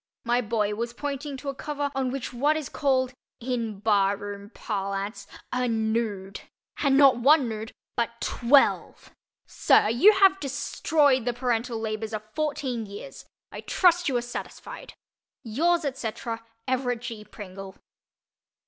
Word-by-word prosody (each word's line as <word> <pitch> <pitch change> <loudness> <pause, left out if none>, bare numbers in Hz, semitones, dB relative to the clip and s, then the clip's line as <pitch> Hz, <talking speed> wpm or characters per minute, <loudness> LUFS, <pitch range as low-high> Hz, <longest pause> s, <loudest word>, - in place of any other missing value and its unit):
My 240 +1 +2
boy 210 -2 0
was 235 +2 -3
pointing 285 +1 -4
to 275 +2 -5
a - - -2
cover 285 +1 -3
on 265 -1 -1
which 260 0 -4
was 240 - -9
what 300 +2 +4
is 305 -4 -5
called—in 255 -5 -2
barroom 205 -1 0
parlance—a 200 +4 -4
"nude." 220 -4 -1 0.4
And 275 -2 +3
not 275 -3 +7
one 275 +2 +5
nude 220 0 -5 0.2
but 235 0 -2
twelve! 270 +3 +2 0.3
Sir, 210 - +3
you 265 - +6
have 390 -1 +5
destroyed 285 -1 +1
the 245 - 0
parental 240 -1 -1
labors 220 0 -4
of 215 0 -3
fourteen 270 -7 -2
years. 200 +7 -10 0.3
I - - -7
trust 355 -3 +3
you 255 - +1
are 240 - -2
satisfied. 240 - -8 0.5
Yours, 330 +9 +1
etc., 230 -3 -4 0.2
EVERETT 250 -2 0
G. 230 -3 -6
PRINGLE. 195 -2 -10
240 Hz, 135 wpm, -26 LUFS, 220-275 Hz, 0.5 s, not